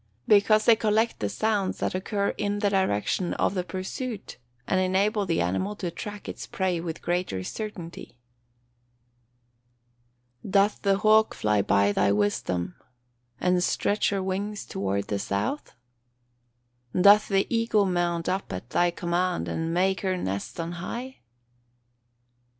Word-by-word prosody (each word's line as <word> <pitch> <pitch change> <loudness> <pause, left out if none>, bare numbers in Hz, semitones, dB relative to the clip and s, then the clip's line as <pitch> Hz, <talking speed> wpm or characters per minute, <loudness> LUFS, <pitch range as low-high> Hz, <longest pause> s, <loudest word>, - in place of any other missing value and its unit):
_ - - -41 0.2
Because 215 +1 +5
they 230 - +7
collect 220 +1 +1
the 105 - -1
sounds 205 - 0
that - - -2
occur 200 +2 -1
in 205 0 -2
the 205 -1 +1
direction 185 - 0
of - - +1
the 185 -2 -1
pursuit, 190 +5 -5 0.3
and 185 - +2
enable 195 +2 +1
the 165 - +1
animal 140 - -1
to 180 -4 -4
track 205 +4 -7
its - - -6
prey 185 -3 -1
with 165 -1 -6
greater 175 - -1
certainty. 175 - -7 2.3
[Verse: - - -7
"Doth 200 +1 +3
the 195 -1 +2
hawk 215 +1 +4
fly 105 -1 +2
by 100 +1 +3
thy 100 - +2
wisdom, 100 -4 0 0.7
and 180 0 +2
stretch 205 +3 +1
her 195 -2 -1
wings 200 +2 -3
toward 100 +1 -2
the 100 -1 -2
south? 100 - -3 1.2
"Doth 205 +3 +7
the 195 -1 +2
eagle 230 -3 +2
mount 175 -2 0
up 190 +2 -2
at 100 +7 -7
thy 175 0 +3
command, 175 +1 -1
and 165 0 -2
make 185 +2 +1
her 185 -2 0
nest 100 - -4
on 165 0 -3
high?" 235 +10 -6
185 Hz, 145 wpm, -26 LUFS, 165-205 Hz, 2.3 s, they